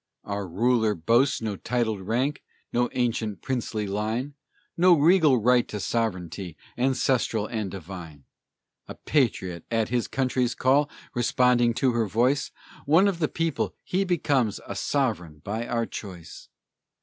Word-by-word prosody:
Our 100 -1 -4
ruler 110 +3 +2
boasts 115 - +2
no 105 -2 -2
titled 110 -1 -1
rank, 125 +9 -1 0.3
No 120 0 +2
ancient, 115 -4 -1
princely 115 -4 -2
line, 110 +7 -2 0.4
No 180 +1 +6
regal 155 -3 +5
right 120 +2 +3
to 105 - -5
sovereignty, 90 -7 -3 0.2
Ancestral 125 -4 +1
and 110 -3 -3
divine. 85 -5 -9 0.6
A - - -8
patriot, 95 - 0
at 115 -2 0
his 120 -1 0
country's 125 -2 0
call, 140 +3 +3 0.2
Responding 120 -1 +3
to 130 0 +2
her 115 -2 0
voice; 125 +8 +1 0.4
One 165 +7 +5
of 190 -4 -1
the 155 - +2
people, 165 -1 -2
he 190 +2 0
becomes 140 - +1
A - - -5
sovereign 100 - -1
by 110 +5 -3
our 115 -1 0
choice! 90 -8 -9
120 Hz, 135 wpm, -26 LUFS, 105-130 Hz, 0.6 s, No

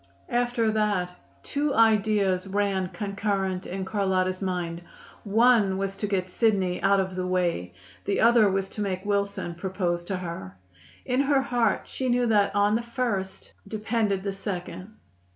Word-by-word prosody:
After 240 -2 +1
that 205 -4 0 0.3
two 285 0 -1
ideas 210 -4 +3
ran 195 -2 0
concurrent 195 -2 -2
in 190 +1 -4
Carlotta's 190 -2 0
mind: 175 -3 -3 0.4
one 215 -2 +4
was 195 0 -2
to 210 - -2
get 185 -2 -1
Sidney 190 -5 +1
out 195 0 +4
of 190 -1 -2
the 185 0 -2
way, 170 - -1 0.3
the 200 - 0
other 230 -2 +5
was 195 0 0
to 210 - -6
make 190 -1 -2
Wilson 200 -3 -1
propose 175 -1 -2
to 190 +1 -2
her. 170 - -7 0.5
In 250 0 0
her 275 -1 +2
heart 245 -4 +1
she 260 -1 -3
knew 245 0 +2
that 210 -4 +2
on 205 +1 +3
the 225 - +1
first 230 -6 -3 0.2
depended 215 -2 -1
the 200 -1 -2
second. 185 +1 -6
200 Hz, 150 wpm, -26 LUFS, 185-220 Hz, 0.5 s, other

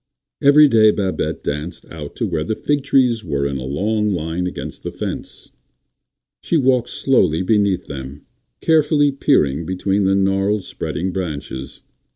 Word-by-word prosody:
Every 150 +1 +7
day 110 -4 +5
Babette 100 -3 -2
danced 75 +4 -4
out 75 -3 -8
to - - -2
where 75 - -2
the 110 +7 -2
fig 145 +4 0
trees 125 -5 +2
were 70 -6 -2
in 70 -1 -2
a 65 - -6
long 105 +10 0
line 85 0 -2
against 90 - -7
the - - -4
fence. - - -7 0.9
She 170 - +1
walked 130 -4 +2
slowly 95 - +2
beneath 100 -3 +1
them, 70 0 -8 0.4
carefully 150 -2 +3
peering 85 - +1
between 95 +3 -1
the 95 +1 +3
gnarled, 95 +1 +1
spreading 95 +1 -4
branches. 75 -7 -6
95 Hz, 150 wpm, -19 LUFS, 80-120 Hz, 0.9 s, Every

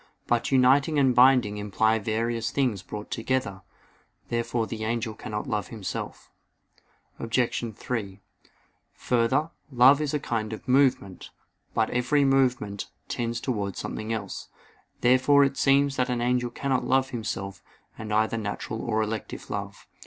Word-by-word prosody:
But 120 +2 0
uniting 135 +4 +4
and 135 -3 +4
binding 125 -4 +5
imply 110 +2 +1
various 115 +2 -1
things 125 -9 0
brought 105 +2 -8
together. 115 -5 -2 0.7
Therefore 115 0 -1
the 110 -1 -6
angel 115 0 -2
cannot 105 -1 -5
love 105 -1 -2
himself. 110 -5 -6 0.9
Obj. 120 +1 0
3: 105 -6 -4 0.8
Further, 125 +6 +1 0.2
love 130 +3 +6
is 150 -1 -1
a - - 0
kind 110 -5 -3
of 110 - -9
movement. 125 -8 +1 0.5
But 110 -1 +1
every 125 +4 +2
movement 125 -7 +1 0.2
tends 120 0 -2
towards 105 -7 -3
something 110 +1 -5
else. 100 -4 -4 0.5
Therefore 130 +3 +5
it 135 0 +1
seems 140 0 +3
that 125 0 +1
an 125 -1 -1
angel 125 0 +1
cannot 130 +1 -1
love 130 +1 +1
himself 100 -5 -4 0.4
with 110 -1 -6
either 110 +2 +1
natural 110 +1 -4
or 110 -2 0
elective 110 -1 -5
love. 100 0 -5
120 Hz, 140 wpm, -26 LUFS, 110-130 Hz, 0.9 s, love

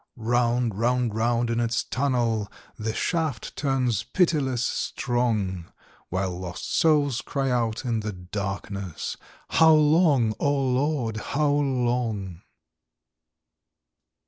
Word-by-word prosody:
Round, 120 -2 0
round, 120 -1 +1
round 115 +1 +1
in 115 - 0
its 115 0 0
tunnel 120 -6 0 0.2
The 110 +1 -3
shaft 155 - -2
turns 130 -6 0
pitiless 140 -9 +1
strong, 110 -11 -1 0.4
While 95 -1 -2
lost 90 -1 -5
souls 145 -5 +3
cry 135 -2 -2
out 115 -1 -1
in 115 -2 0
the 105 0 -3
darkness: 100 0 -5 0.3
"How 160 0 +6
long, 150 -7 +4
O 145 - +2
Lord, 135 -3 0
how 145 +7 0
long?" 120 - -1
120 Hz, 105 wpm, -25 LUFS, 110-135 Hz, 0.4 s, How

